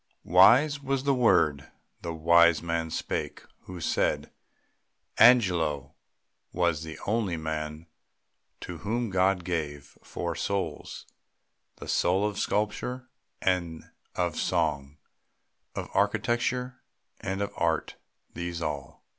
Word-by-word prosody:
Wise 120 - +5
was 135 -1 -1
the 140 0 +2
word 90 - +2 0.3
the 85 - -4
wise 85 +1 +4
man 85 -1 -2
spake, - - -4 0.2
who 90 -1 -8
said, 80 - 0 0.9
"Angelo 90 - +4 0.6
was 85 -3 0
the 80 -1 -7
only 105 -5 0
man 80 0 -4 0.8
to 90 -2 -7
whom 115 +1 -2
God 95 0 +2
gave 75 -5 -4
Four 85 -1 -4
souls," 95 -6 -3 0.7
the - - -10
soul 95 +4 +2
of 105 -2 -4
sculpture 125 +5 -2 0.3
and 85 -3 -1 0.2
of 85 -3 -1
song, 75 -5 -1 0.8
Of - - -4
architecture 125 +2 0 0.4
and 95 +1 -3
of 100 - -2
art; 80 -2 -1 0.4
these 85 0 -4
all. 75 -4 -5
90 Hz, 110 wpm, -28 LUFS, 80-105 Hz, 0.9 s, Wise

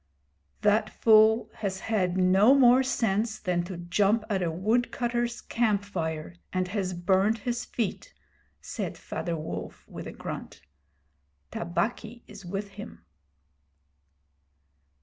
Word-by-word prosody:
'The 210 +1 +2
fool 220 0 +5
has 190 -3 -3
had 190 -5 0
no 190 +7 +5
more 255 -1 +6
sense 220 -3 0
than 180 -3 -1
to 180 0 -7
jump 200 +5 +1
at 195 -2 +1
a 175 - 0
woodcutters' 240 +5 -1
camp 215 -4 0
fire, 160 -4 -4 0.2
and 185 -1 -1
has 185 -2 -2
burned 190 +5 +2
his 240 +2 -3
feet,' 235 - -3 0.5
said - - -5
Father 170 -3 -4
Wolf, 155 - -7
with - - -8
a - - -6
grunt. - - -7 0.9
'Tabaqui 220 +6 -3
is 205 -1 -12
with 195 +3 -4
him.' 205 +3 -11
205 Hz, 120 wpm, -27 LUFS, 185-225 Hz, 0.9 s, more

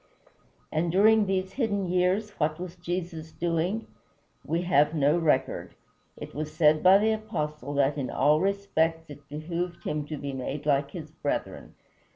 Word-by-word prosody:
And 165 +2 0
during 210 +3 +5
these 190 0 -1
hidden 205 -7 -1
years 185 +4 +1
what 155 +1 0
was 180 -1 -6
Jesus 175 -2 -5
doing? 170 +6 -1 0.6
We 170 +2 -1
have 150 -2 +3
no 145 +1 +3
record. 150 -5 0 0.4
It - - -9
was 150 +3 -4
said 155 -1 +4
by 185 +1 +7
the 215 +2 +2
Apostle 150 - -3
that 140 +1 +2
"in 130 - -3
all 150 +3 +3
respects 165 -5 0
it 145 -1 -13
behooved 170 +4 -4
him 150 -1 -3
to 155 - -5
be 140 -1 -5
made 135 +3 -4
like 140 -1 +2
his 155 0 -8
brethren." 145 -2 -4
165 Hz, 160 wpm, -27 LUFS, 150-185 Hz, 0.6 s, by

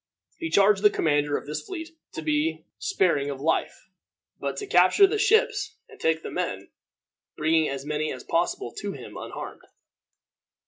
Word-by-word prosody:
He 330 -1 -3
charged 200 -3 +4
the 210 - +7
commander 145 -5 +1
of - - -8
this 150 +1 -4
fleet 335 -4 -7 0.2
to - - -5
be 305 +1 0
sparing 165 - +1
of 140 -1 -5
life, 160 +5 -1 0.5
but 140 -1 -3
to - - -3
capture 185 - +6
the 425 +2 0
ships 440 +2 +2
and - - -16
take 160 0 +1
the - - -6
men, 100 - -3 0.7
bringing 160 0 +2
as 135 0 -5
many 150 +1 -1
as 130 - -7
possible 165 -8 -1
to 205 -1 -4
him - - -10
unharmed. - - -7
165 Hz, 165 wpm, -26 LUFS, 145-210 Hz, 0.7 s, the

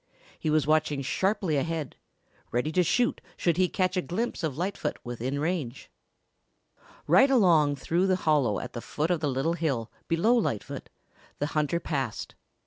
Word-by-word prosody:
He 155 - -1
was 155 -2 +3
watching 150 -2 +1
sharply 190 +2 0
ahead, 160 0 -2 0.6
ready 125 +6 0
to 180 - +3
shoot 240 +8 +1 0.2
should 170 -2 +1
he 185 -1 +3
catch 185 0 0
a 180 - +2
glimpse 220 +6 -3
of 155 -5 -2
Lightfoot 180 -3 -2
within 120 +3 -3
range. 150 -6 -3 1.1
Right 270 - +6
along 170 - +4
through 170 +6 0
the 185 - +3
hollow 150 - +2
at 125 - -7
the 120 - -5
foot 155 +8 -2
of 175 - +1
the 150 - -1
little 135 +5 0
hill 135 -10 -2 0.2
below 170 +9 +3
Lightfoot 200 - -2 0.5
the 145 - -1
hunter 155 +2 +1
passed. 135 -9 -3
155 Hz, 160 wpm, -28 LUFS, 140-180 Hz, 1.1 s, Right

